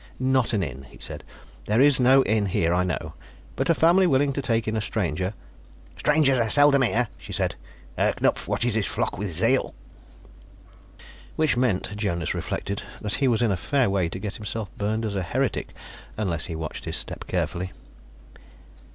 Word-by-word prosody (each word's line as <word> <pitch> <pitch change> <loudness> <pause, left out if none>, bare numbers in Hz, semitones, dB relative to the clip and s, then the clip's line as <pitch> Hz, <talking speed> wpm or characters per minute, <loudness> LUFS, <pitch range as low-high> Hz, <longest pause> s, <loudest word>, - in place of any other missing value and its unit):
"Not 130 -1 +2
an 100 -3 +1
inn," 70 -4 -6
he - - -15
said. - - -7 0.4
"There 105 +3 +2
is 140 0 +5
no 130 +2 +6
inn 105 -1 +1
here, 85 -2 +1
I 90 +1 +2
know. 90 -3 -3 0.4
But - - -1
a 165 - +5
family 175 +4 +5
willing 140 -1 +2
to 140 - -2
take 115 -4 0
in 110 - -1
a 110 - 0
stranger 95 -2 -2 0.3
" - - -25
"Strangers 145 -4 +3
are 115 -1 +1
seldom 145 +1 +6
here," 120 -1 +2
she - - -10
said. - - -1 0.4
"Herr - - +2
Knupf - - 0
watches 120 -1 0
his 110 -2 0
flock - - -2
with 100 -2 -3
zeal." 115 +11 +1 1.6
Which 155 -3 +2
meant, 110 -4 0
Jonas 95 -6 -1
reflected, 100 +1 -3 0.2
that 105 -2 -2
he 135 - +4
was 120 -1 +2
in 115 - +2
a - - +1
fair 130 +2 +1
way 95 -4 +1
to 90 - -5
get 100 +2 -5
himself 105 -1 -5
burned 110 +2 -1
as 105 -2 -3
a 95 - 0
heretic 85 - -1 0.5
unless 85 -6 -1
he 85 - -5
watched 80 -1 -5
his - - -1
step - - -6
carefully. 90 +1 -2
110 Hz, 185 wpm, -25 LUFS, 95-130 Hz, 1.6 s, no